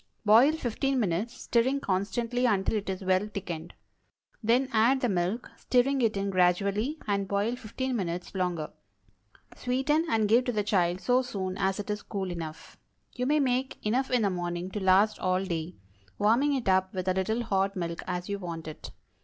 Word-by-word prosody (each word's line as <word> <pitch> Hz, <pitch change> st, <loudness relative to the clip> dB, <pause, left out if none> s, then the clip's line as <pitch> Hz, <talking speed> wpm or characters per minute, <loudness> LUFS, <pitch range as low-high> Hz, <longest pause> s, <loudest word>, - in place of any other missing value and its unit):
Boil 235 Hz, +8 st, +6 dB
fifteen 270 Hz, -1 st, -1 dB
minutes, 210 Hz, +3 st, -2 dB
stirring 255 Hz, +4 st, +2 dB
constantly 235 Hz, +3 st, 0 dB
until 200 Hz, -1 st, +1 dB
it 205 Hz, -2 st, -2 dB
is 190 Hz, 0 st, -4 dB
well 185 Hz, +2 st, +2 dB
thickened. 175 Hz, -5 st, -6 dB, 0.7 s
Then 245 Hz, +4 st, +2 dB
add 235 Hz, +5 st, +4 dB
the 245 Hz, -, +1 dB
milk, 185 Hz, +5 st, -1 dB
stirring 260 Hz, +2 st, +2 dB
it 220 Hz, -3 st, +1 dB
in 195 Hz, 0 st, -1 dB
gradually, 200 Hz, -, +1 dB
and 200 Hz, -1 st, 0 dB
boil 205 Hz, +5 st, 0 dB
fifteen 255 Hz, +2 st, -4 dB
minutes 180 Hz, -4 st, -3 dB
longer. 180 Hz, -5 st, -2 dB, 0.8 s
Sweeten, 270 Hz, +6 st, 0 dB
and 220 Hz, -2 st, +2 dB
give 235 Hz, +4 st, +4 dB
to 245 Hz, -, 0 dB
the 210 Hz, -3 st, 0 dB
child 185 Hz, -3 st, +1 dB
so 245 Hz, +7 st, +3 dB
soon 190 Hz, -7 st, -4 dB
as 190 Hz, 0 st, 0 dB
it 205 Hz, +1 st, -3 dB
is 210 Hz, -, -3 dB
cool 190 Hz, -3 st, -4 dB
enough. 160 Hz, -2 st, -8 dB, 0.3 s
You 250 Hz, 0 st, -2 dB
may 300 Hz, +2 st, +3 dB
make 260 Hz, -1 st, 0 dB
enough 255 Hz, +5 st, +1 dB
in 250 Hz, -3 st, +2 dB
the 200 Hz, -, +2 dB
morning 175 Hz, 0 st, -3 dB
to 210 Hz, -, -3 dB
last 195 Hz, +3 st, +3 dB
all 185 Hz, +1 st, 0 dB
day; 170 Hz, -1 st, -4 dB, 0.4 s
warming 250 Hz, +8 st, +3 dB
it 255 Hz, -6 st, -3 dB
up 190 Hz, 0 st, +2 dB
with 185 Hz, 0 st, -3 dB
a 185 Hz, -, +3 dB
little 220 Hz, +6 st, -1 dB
hot 195 Hz, -2 st, 0 dB
milk 170 Hz, -2 st, -3 dB
as 180 Hz, -1 st, -3 dB
you 200 Hz, 0 st, -3 dB
want 170 Hz, -3 st, -6 dB
it. 155 Hz, -, -8 dB
205 Hz, 185 wpm, -28 LUFS, 185-245 Hz, 0.8 s, Boil